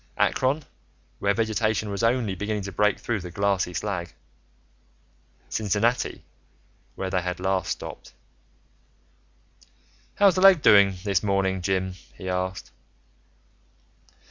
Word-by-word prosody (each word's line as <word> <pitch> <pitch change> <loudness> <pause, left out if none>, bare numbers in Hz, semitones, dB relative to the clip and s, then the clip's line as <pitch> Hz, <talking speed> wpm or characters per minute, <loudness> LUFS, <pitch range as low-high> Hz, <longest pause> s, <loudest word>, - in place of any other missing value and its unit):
Akron, 135 +4 +1 0.6
where 100 0 +1
vegetation 110 -1 0
was 100 - -3
only 115 -3 +1
beginning 105 +2 -3
to 100 - -5
break 105 +3 +2
through 115 -3 -2
the 90 -1 -8
glassy 100 -1 0
slag... 90 -5 -3 1.3
Cincinnati, 110 +3 0 0.7
where 95 -1 -4
they 90 -1 +1
had 90 -1 -4
last 95 -1 -1
stopped.... - - -6 2.0
"How's 200 -2 +5
the 185 - -1
leg 190 -5 +7
this 100 -3 +4
morning, 95 -2 0
Jim?" 95 +1 -1 0.2
he 95 - -8
asked. 90 0 -3
100 Hz, 110 wpm, -25 LUFS, 95-110 Hz, 2.0 s, leg